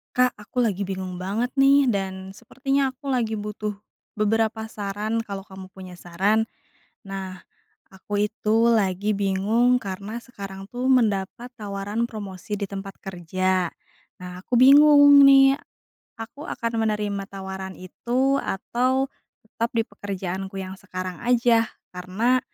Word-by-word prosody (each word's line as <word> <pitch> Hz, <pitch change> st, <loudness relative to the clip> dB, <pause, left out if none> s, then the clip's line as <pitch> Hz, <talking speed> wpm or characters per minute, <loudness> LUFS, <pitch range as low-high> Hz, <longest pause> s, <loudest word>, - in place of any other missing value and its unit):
Kak, 250 Hz, 0 st, +4 dB
aku 210 Hz, +4 st, -3 dB
lagi 200 Hz, -4 st, 0 dB
bingung 185 Hz, -1 st, -5 dB
banget 200 Hz, +7 st, -2 dB
nih, 275 Hz, 0 st, +5 dB
dan 190 Hz, -3 st, -3 dB
sepertinya 270 Hz, 0 st, -1 dB
aku 275 Hz, +2 st, -8 dB
lagi 240 Hz, -4 st, 0 dB
butuh 210 Hz, 0 st, -4 dB, 0.4 s
beberapa 220 Hz, +1 st, 0 dB
saran, 210 Hz, +1 st, -3 dB
kalau 200 Hz, -1 st, -5 dB
kamu 190 Hz, -1 st, -12 dB
punya 185 Hz, -2 st, -10 dB
saran. 195 Hz, +6 st, +1 dB, 0.6 s
Nah, 190 Hz, -1 st, -6 dB, 0.5 s
aku 205 Hz, +2 st, -2 dB
itu 225 Hz, +1 st, +2 dB
lagi 205 Hz, -2 st, +1 dB
bingung 205 Hz, +6 st, +2 dB
karena 200 Hz, +3 st, -5 dB
sekarang 195 Hz, -5 st, -9 dB
tuh 245 Hz, +2 st, -4 dB
mendapat 225 Hz, -1 st, +1 dB
tawaran 205 Hz, +1 st, -3 dB
promosi 205 Hz, -2 st, -7 dB
di 200 Hz, -, -1 dB
tempat 195 Hz, 0 st, -6 dB
kerja. 185 Hz, 0 st, -1 dB, 0.5 s
Nah, 180 Hz, 0 st, -8 dB
aku -, -, -9 dB
bingung 285 Hz, +2 st, +8 dB
nih, 270 Hz, 0 st, +7 dB, 0.6 s
aku 230 Hz, +6 st, -9 dB
akan 230 Hz, 0 st, -3 dB, 0.2 s
menerima 205 Hz, -2 st, -2 dB
tawaran 190 Hz, -1 st, -7 dB
itu, 255 Hz, +9 st, 0 dB
atau, 255 Hz, +7 st, 0 dB, 0.4 s
tetap 230 Hz, +1 st, -3 dB
di 225 Hz, -, +2 dB
pekerjaanku 190 Hz, -1 st, -5 dB
yang 190 Hz, 0 st, -7 dB
sekarang 185 Hz, -2 st, -6 dB
aja? 235 Hz, -2 st, +3 dB, 0.3 s
Karena 205 Hz, +8 st, +1 dB
210 Hz, 130 wpm, -24 LUFS, 190-240 Hz, 0.6 s, bingung